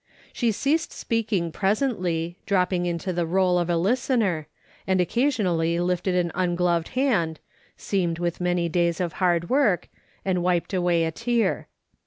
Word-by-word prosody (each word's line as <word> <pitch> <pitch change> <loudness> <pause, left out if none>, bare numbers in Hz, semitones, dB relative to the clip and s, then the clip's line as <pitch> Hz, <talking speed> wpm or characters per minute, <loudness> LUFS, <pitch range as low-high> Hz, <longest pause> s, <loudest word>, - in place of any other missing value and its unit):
Slie 235 -3 +1
ceased 300 +9 0
speaking 215 -7 -1
presently, 185 - -1
dropping 180 -2 +1
into 175 +2 -2
the 170 -1 -1
role 180 0 +2
of 175 0 -1
a 170 - +2
listener, 210 - +1 0.4
and 190 -1 +2
occasionally 180 - +1
lifted 180 +1 0
an 175 -2 +1
ungloved 175 -2 +1
hand, 185 - +1 0.4
seamed 175 -4 -1
with 175 0 -2
many 175 -1 +1
days 170 0 0
of 175 -3 -2
hard 175 0 +2
work, 255 -10 +2 0.4
and 185 -2 +1
wiped 175 +1 0
away 175 -2 +2
a 160 - -1
tear. 230 +5 0
180 Hz, 145 wpm, -25 LUFS, 170-205 Hz, 0.4 s, role